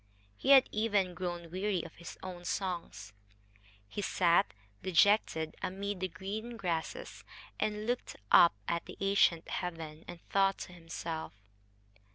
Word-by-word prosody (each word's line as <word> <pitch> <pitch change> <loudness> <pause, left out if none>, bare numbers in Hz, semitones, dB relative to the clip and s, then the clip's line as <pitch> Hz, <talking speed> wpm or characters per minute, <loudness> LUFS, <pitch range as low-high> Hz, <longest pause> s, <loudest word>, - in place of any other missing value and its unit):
He 265 - -3
had 270 -2 +9
even 205 -4 +1
grown 175 -1 -4
weary 190 -1 0
of 165 - -9
his 170 - -9
own 180 -2 -7
songs. 170 - -3 0.7
He 205 - -4
sat, 170 - +3 0.3
dejected, 180 -3 +3
amid 195 +1 -3
the 185 - 0
green 205 +7 -6
grasses, 180 - -3 0.4
and 210 0 -1
looked 245 +2 -2 0.2
up 170 - +8
at 170 0 -1
the - - -9
ancient 195 -4 +3
heaven 165 -3 -5
and 175 -1 -8
thought 195 0 +3
to 180 - -7
himself. 165 - -6
180 Hz, 135 wpm, -32 LUFS, 165-200 Hz, 0.7 s, had